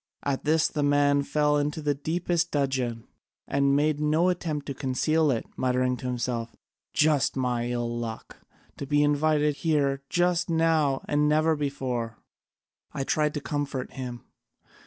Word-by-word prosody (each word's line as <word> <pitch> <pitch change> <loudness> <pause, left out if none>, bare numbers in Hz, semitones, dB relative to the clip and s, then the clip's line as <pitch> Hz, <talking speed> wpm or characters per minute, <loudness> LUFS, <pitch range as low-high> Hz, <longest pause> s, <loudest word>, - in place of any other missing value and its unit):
At 140 0 -2
this 160 +2 +2
my 150 - +1
man 145 0 +3
fell 150 +1 +1
into 145 +2 -1
the 150 -1 0
deepest 170 +4 -1
dudgeon, 130 -6 -1 0.4
and 140 0 +2
made 150 +1 +2
no 155 +4 +2
attempt 160 -5 -2
to 140 - -4
conceal 150 +4 +1
it, 120 -4 0
muttering 125 0 +1
to 130 - -6
himself, 120 -2 -3 0.4
'Just 150 -3 +2
like - - 0
my 120 -1 -1
ill 120 -1 -2
luck! 115 -1 -6 0.4
To 140 - -6
be 145 +1 +3
invited 150 0 +2
here 140 -4 +1
just 175 0 +1
now 160 -4 +2
and 150 0 +2
never 155 +1 +3
before!' 130 -6 -3 0.7
I 140 -3 -3
tried 150 +2 0
to 150 - -2
comfort 140 -3 -3
him. 125 -3 -7
145 Hz, 155 wpm, -27 LUFS, 130-155 Hz, 0.7 s, man